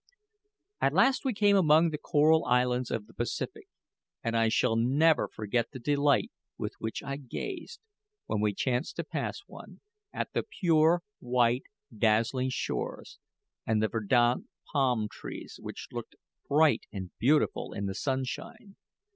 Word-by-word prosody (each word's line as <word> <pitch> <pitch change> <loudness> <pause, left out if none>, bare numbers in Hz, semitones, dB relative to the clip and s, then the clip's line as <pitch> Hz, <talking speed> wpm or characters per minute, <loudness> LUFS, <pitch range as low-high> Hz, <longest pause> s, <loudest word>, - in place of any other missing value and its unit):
At - - +2
last 265 0 +4
we 265 - +2
came 205 -2 +3
among 160 -2 +5
the 150 - -4
Coral 155 +2 +3
Islands 125 0 +2
of 105 - -3
the 115 - -19
Pacific; 120 - -4 0.6
and 115 0 -1
I 115 -1 +3
shall 115 0 +2
never 140 +8 +3
forget 115 +2 -2
the - - -8
delight 145 +2 +2 0.3
with - - -4
which 110 0 -4
I 140 0 -4
gazed 350 - -6 0.5
when 105 - -1
we 105 -1 +2
chanced 130 - -1
to - - -3
pass - - -4
one - - -13 0.3
at - - -4
the - - +1
pure 170 - +2 0.2
white, 125 0 +1 0.3
dazzling 115 +4 +2
shores, 130 - -4 0.5
and 110 -1 +2
the 110 0 +1
verdant 120 +3 +2 0.2
palm 125 -6 +2
trees, - - -9
which - - -7
looked - - -7 0.3
bright 145 -4 +3
and 95 -3 -6
beautiful 145 +6 +2
in 100 -1 -4
the 95 - -2
sunshine. 195 - -4
130 Hz, 145 wpm, -29 LUFS, 115-155 Hz, 0.6 s, among